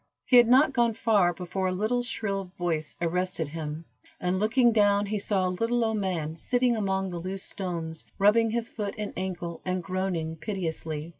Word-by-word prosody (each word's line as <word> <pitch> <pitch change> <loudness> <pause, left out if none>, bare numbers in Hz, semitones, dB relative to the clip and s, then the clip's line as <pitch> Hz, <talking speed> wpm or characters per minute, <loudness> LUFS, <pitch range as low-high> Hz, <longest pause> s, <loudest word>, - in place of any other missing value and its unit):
He 250 - +6
had 240 -1 +8
not 270 +4 +5
gone 235 -3 +2
far, 210 -6 +3
before 180 +2 -3
a - - 0
little 215 +6 0
shrill 200 -5 -3
voice 160 -4 -2
arrested 175 -2 -1
him, 155 +1 -5 0.3
and 180 +1 0
looking 235 +3 +4
down, 205 -2 +3
he 210 +1 -2
saw 195 -2 +1
a - - 0
little 230 +6 0
old 220 -1 0
man, 170 -6 -2
sitting 245 +6 +1
among 195 -3 -1
the 175 - -4
loose 190 +2 -5
stones, 165 -4 -5
rubbing 220 +3 +4
his 230 +1 -1
foot 205 -3 -4
and 210 -1 -4
ankle, 175 -2 -4
and 185 -1 -2
groaning 180 -4 -2
piteously. 160 -5 -4
190 Hz, 180 wpm, -27 LUFS, 175-220 Hz, 0.3 s, had